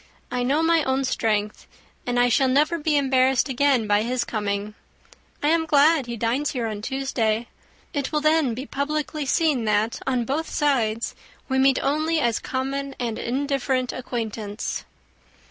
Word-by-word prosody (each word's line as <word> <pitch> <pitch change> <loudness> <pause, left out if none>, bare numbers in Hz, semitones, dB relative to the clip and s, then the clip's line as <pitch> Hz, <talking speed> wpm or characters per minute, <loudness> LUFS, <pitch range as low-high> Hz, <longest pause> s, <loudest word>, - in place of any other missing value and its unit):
I 250 0 -1
know 280 +6 +1
my 330 -1 +3
own 265 0 0
strength, 215 -4 -1 0.4
and 245 0 +1
I 245 - +5
shall 260 +2 +3
never 300 +6 +2
be 300 -1 +1
embarrassed 265 -1 +2
again 265 -2 +2
by 205 0 +3
his 245 +2 -1
coming. 205 -1 -3 0.7
I 295 - +3
am 325 0 +2
glad 295 -2 +4
he 235 -1 -4
dines 235 +7 0
here 245 -4 -2
on 215 -2 -4
Tuesday. 235 -3 -1 0.5
It 285 -4 -2
will 305 - +1
then 305 -6 +2
be 260 +3 -5
publicly 300 +1 -3
seen, 295 -5 +2
that 215 +2 +1
on 250 -3 +1
both 300 +6 -2
sides 235 -6 0 0.3
we 265 -1 +1
meet 270 0 +4
only 310 +3 +1
as 235 -5 +1
common 275 +1 -3
and 235 -3 -2
indifferent 265 0 -1
acquaintance." 225 -4 -4
265 Hz, 160 wpm, -24 LUFS, 230-285 Hz, 0.7 s, I